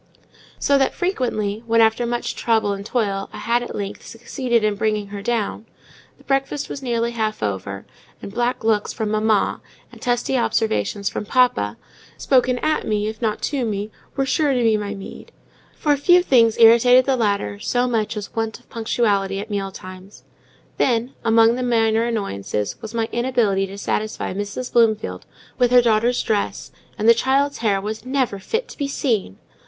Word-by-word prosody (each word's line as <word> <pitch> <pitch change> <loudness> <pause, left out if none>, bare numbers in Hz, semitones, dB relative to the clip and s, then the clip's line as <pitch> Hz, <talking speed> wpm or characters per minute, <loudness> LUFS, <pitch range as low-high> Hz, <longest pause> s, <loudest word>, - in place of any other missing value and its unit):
So 280 -1 +2
that, 270 - +1
frequently, 230 - -1
when, 230 0 +3
after 225 +1 +3
much 240 0 -2
trouble 220 -3 +1
and 200 0 -6
toil, 200 -3 -2
I - - -9
had, 235 +2 0
at 240 - -6
length, 200 -1 -5
succeeded 235 0 -2
in 215 -1 +2
bringing 210 0 -1
her 200 0 -6
down, 225 0 -2 0.5
the - - -21
breakfast 275 +1 -1
was 280 - -6
nearly 235 -2 -1
half 215 - -2
over; 100 -1 -4 0.3
and 200 - -9
black 240 +1 -1
looks 215 -2 +1
from 215 -2 -3
"mamma," 215 -1 +1 0.3
and - - -15
testy 245 +1 0
observations 200 - 0
from 210 - -3
"papa," 115 - +2 0.4
spoken 255 -2 +2
at 310 0 0
me, 210 -1 0
if 220 +1 -9
not 220 -2 -1
to 280 -3 -1
me, 210 -1 -3 0.2
were 270 -1 0
sure 290 +2 +1
to 250 -2 +1
be 225 -1 +4
my 205 -1 -3
meed: 195 - -10 0.5
for 295 -1 +2
few 350 +5 +4
things 230 -7 +4
irritated 235 +2 +6
the 270 - +2
latter 200 - -1
so 245 - 0
much 225 -2 -1
as 205 - -7
want 225 0 -2
of 245 - -27
punctuality 205 -4 0
at 210 +2 -7
meal 195 -1 -2
times. 185 +1 -12 0.5
Then, 240 +1 +1
among 225 0 +5
the 250 - -3
minor 225 -2 +2
annoyances, 105 - -3
was 220 0 -8
my 225 -1 0
inability 235 -6 +1
to 195 +1 -9
satisfy 215 0 -2
Mrs. 205 +6 -5
Bloomfield 215 - +1 0.3
with 245 -1 +4
her 250 0 +7
daughter's 235 +2 +2
dress; 210 -2 -2 0.3
and 215 - 0
the 230 - +9
child's 275 +4 +1
hair 205 -4 +1
"was 215 +2 -5
never 255 -6 -1
fit 455 - -3
to - - -11
be 285 - -1
seen." 225 - -1
225 Hz, 180 wpm, -21 LUFS, 205-245 Hz, 0.5 s, the